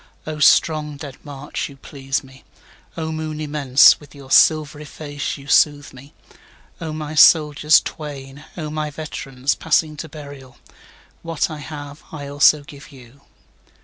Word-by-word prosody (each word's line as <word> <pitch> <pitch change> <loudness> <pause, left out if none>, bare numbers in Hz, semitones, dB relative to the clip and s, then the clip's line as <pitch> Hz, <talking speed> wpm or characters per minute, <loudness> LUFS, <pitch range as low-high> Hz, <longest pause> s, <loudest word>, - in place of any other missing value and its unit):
8O 155 -1 -6
strong 150 -2 +3
dead 140 -2 -9
march, 145 -1 -6
you 140 - -14
please 135 0 -4
me!O 135 +4 -11
moon 155 -1 -5
immense, 145 -3 +4
with 145 -1 -17
your 135 -1 -13
silvery 155 -1 +4
face 145 -1 -6
you 140 - -13
soothe 145 0 +2
me!O 140 +4 -13
my 155 0 -6
soldiers 150 -1 +5
twain! 140 -2 -9
O 155 -3 -5
my 155 0 -3
veterans, 140 -3 -3
passing 155 -1 0
to 160 - -7
burial! 140 -4 -12 0.6
What 165 -1 -2
I 155 - -7
have 145 -1 -9
I 150 -3 -7
also 145 +1 +3
give 140 0 -14
you. 130 0 -17
145 Hz, 140 wpm, -20 LUFS, 140-155 Hz, 0.6 s, soldiers